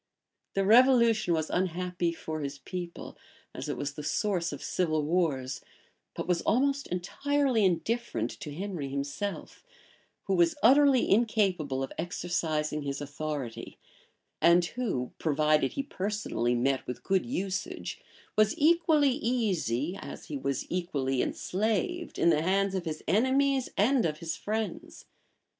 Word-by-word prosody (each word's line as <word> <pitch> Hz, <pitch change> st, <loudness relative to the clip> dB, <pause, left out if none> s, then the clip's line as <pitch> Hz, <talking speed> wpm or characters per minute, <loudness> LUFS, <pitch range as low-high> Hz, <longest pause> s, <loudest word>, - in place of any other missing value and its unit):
The 195 Hz, 0 st, +2 dB
revolution 230 Hz, -4 st, +5 dB
was 160 Hz, -1 st, -2 dB
unhappy 180 Hz, -1 st, -1 dB
for 160 Hz, -1 st, -5 dB
his 140 Hz, 0 st, -4 dB
people, 175 Hz, +4 st, -7 dB, 0.3 s
as -, -, -6 dB
it -, -, -2 dB
was 145 Hz, 0 st, -3 dB
the 150 Hz, -, -7 dB
source 180 Hz, +2 st, 0 dB
of 145 Hz, -, -7 dB
civil 155 Hz, -4 st, 0 dB
wars; 150 Hz, -6 st, 0 dB, 0.5 s
but -, -, -4 dB
was 180 Hz, -2 st, +1 dB
almost 275 Hz, +3 st, +1 dB
entirely 260 Hz, +7 st, 0 dB
indifferent 180 Hz, -, 0 dB
to 150 Hz, -, -6 dB
Henry 170 Hz, -3 st, -4 dB
himself, 140 Hz, +9 st, -4 dB, 0.6 s
who 195 Hz, -, -1 dB
was 170 Hz, -2 st, +3 dB
utterly 270 Hz, +1 st, +6 dB
incapable 190 Hz, -, +1 dB
of 135 Hz, -, -5 dB
exercising 160 Hz, -3 st, -1 dB
his 140 Hz, -1 st, -3 dB
authority, 145 Hz, -4 st, -5 dB, 0.6 s
and 170 Hz, +1 st, +5 dB
who, 210 Hz, -, -2 dB
provided 150 Hz, -2 st, +2 dB
he 275 Hz, -, -2 dB
personally 200 Hz, -, -1 dB
met 135 Hz, +2 st, 0 dB
with 125 Hz, -, -6 dB
good 190 Hz, +1 st, +1 dB
usage, 195 Hz, -6 st, -3 dB, 0.3 s
was 215 Hz, 0 st, +3 dB
equally 315 Hz, -2 st, +4 dB
easy, 195 Hz, -, 0 dB
as -, -, -8 dB
he 150 Hz, -, -4 dB
was 140 Hz, -1 st, -2 dB
equally 140 Hz, -8 st, -1 dB
enslaved, 225 Hz, -, -1 dB
in 170 Hz, -, +4 dB
the 155 Hz, -1 st, +2 dB
hands 195 Hz, +3 st, +1 dB
of 185 Hz, -2 st, -2 dB
his 155 Hz, -1 st, -4 dB
enemies 265 Hz, +4 st, +2 dB
and 245 Hz, +5 st, +3 dB
of 150 Hz, -1 st, -4 dB
his 160 Hz, 0 st, -4 dB
friends. 220 Hz, +1 st, -4 dB
180 Hz, 135 wpm, -29 LUFS, 150-225 Hz, 0.6 s, utterly